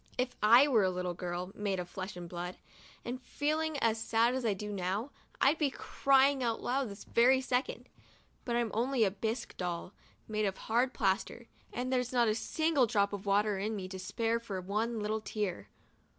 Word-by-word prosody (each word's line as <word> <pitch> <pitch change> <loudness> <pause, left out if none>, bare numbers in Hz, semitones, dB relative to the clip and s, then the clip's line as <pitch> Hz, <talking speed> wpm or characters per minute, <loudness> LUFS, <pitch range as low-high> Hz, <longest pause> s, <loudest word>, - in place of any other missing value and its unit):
If 250 0 -1
I 235 +6 +7
were 240 -7 +4
a 190 - +3
little 180 -1 -2
girl, 180 +1 -4
made 200 -2 -2
of 180 - -4
flesh 185 +1 -6
and 175 -1 -7
blood, 175 +1 -5 0.5
and 250 +2 -4
feeling 310 +3 -1
as 225 -4 +1
sad 230 +2 +2
as 260 -1 -2
I 215 -4 +1
do 210 +2 -5
now, 200 +7 -2 0.3
I'd 290 +4 +4
be 295 -3 +3
crying 275 +1 +3
out 230 -2 0
loud 260 -1 0
this 200 +1 -9
very 255 +3 +4
second; 255 0 -2 0.6
but 235 - -2
I'm 235 -2 0
only 245 +2 +2
a 195 - +2
bisque 220 +4 -3
doll, 180 +1 -4 0.3
made 215 -1 0
of 195 -1 -1
hard 245 +4 0
plaster, 195 +4 0 0.3
and 255 +2 -2
there's 250 -1 0
not 240 -2 +3
a 215 - +3
single 290 +4 +1
drop 200 -1 +1
of 200 0 -6
water 205 0 +2
in 215 +3 -2
me 190 -2 -5
to 190 0 -6
spare 230 +4 -1
for 205 -5 -5
one 215 +5 -1
little 215 +1 -1
tear. 210 -4 -3
225 Hz, 195 wpm, -32 LUFS, 195-250 Hz, 0.6 s, I